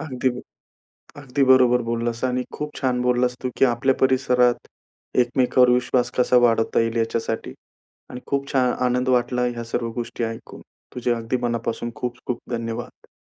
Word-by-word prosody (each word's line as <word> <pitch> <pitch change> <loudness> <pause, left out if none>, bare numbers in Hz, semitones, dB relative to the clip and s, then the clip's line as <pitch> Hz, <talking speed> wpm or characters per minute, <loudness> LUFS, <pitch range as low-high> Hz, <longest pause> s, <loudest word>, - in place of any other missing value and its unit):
अगदी 130 -5 -1 0.9
अगदी 140 0 -1
बरोबर 125 -1 +5
बोललास. 115 +1 -2
आणि 125 0 0
खूप 150 0 -5
छान 125 -2 0
बोललास 125 0 +1
तू, 125 - 0
की - - +5
आपल्या 130 +2 +1
परिसरात 125 -2 +2 0.6
एकमेकांवर 125 0 +3
विश्वास 125 0 +1
कसा 125 0 +4
वाढवता 115 -1 +2
येईल 115 0 0
याच्यासाठी. 115 0 -2 0.6
आणि 125 - -7
खूप 140 0 -2
छान 125 -2 +3 0.2
आनंद 125 +1 0
वाटला 125 0 +1
ह्या 120 -1 -3
सर्व 115 -1 -1
गोष्टी 115 0 -5
ऐकून. 115 0 -6 0.3
तुझे 125 -1 0
अगदी 115 +2 -2
मनापासून 120 0 -2
खूप-खूप 125 0 -4
धन्यवाद. 115 0 -5
125 Hz, 145 wpm, -22 LUFS, 120-125 Hz, 0.9 s, बरोबर